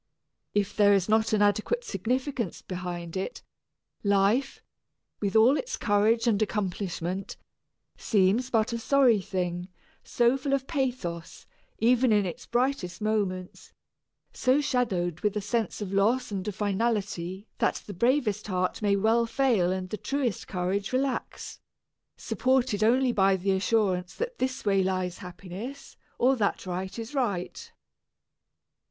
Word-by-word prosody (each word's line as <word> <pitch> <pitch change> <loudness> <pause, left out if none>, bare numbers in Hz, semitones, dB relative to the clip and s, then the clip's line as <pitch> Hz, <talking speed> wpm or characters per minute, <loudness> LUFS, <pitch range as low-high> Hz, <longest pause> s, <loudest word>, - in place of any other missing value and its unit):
If 205 -1 0
there 205 -1 +5
is 190 -2 +1
not 220 +1 +2
an 210 -1 +3
adequate 215 - +1
significance 255 - -2
behind 175 -2 -5
it, 190 - -4 0.6
life, 200 +6 +2 0.6
with 200 -1 -2
all 230 +5 +6
its - - -4
courage 215 +3 +2
and 220 -3 +2
accomplishment, 190 -3 -3 0.6
seems 210 +4 +2
but 230 0 +1
a 235 - -2
sorry 245 -4 +4
thing, 180 -1 -3 0.4
so 240 +2 +2
full 275 +1 -2
of 270 -1 0
pathos, 245 - -3 0.3
even 245 +2 +3
in 205 -2 +3
its 175 - -6
brightest 245 -7 -1
moments, 200 -4 -2 0.6
so 260 +2 +2
shadowed 190 - 0
with 210 0 0
a - - +1
sense 220 +2 -2
of 195 -1 -6
loss 225 +5 +2
and 195 0 -4
of 205 - -3
finality 205 -2 -2
that - - 0
the 205 - -7
bravest 220 0 +1
heart 185 0 -1
may 205 -1 +3
well 225 +3 +2
fail 225 -7 +2
and 185 -1 -4
the 215 - -2
truest 265 0 -2
courage 190 +2 -2
relax, 260 +1 -2 0.6
supported 255 -5 +1
only 250 +3 +3
by 195 -3 +3
the 190 +1 0
assurance 190 -2 +1
that 480 +1 -4
this 260 -1 -2
way 195 -1 +3
lies 185 -1 -2
happiness 190 +9 -8 0.2
or 260 +2 +4
that 205 -5 -1
right 185 +2 -4
is 230 +4 -6
right. 250 - -2
210 Hz, 140 wpm, -27 LUFS, 190-245 Hz, 0.6 s, all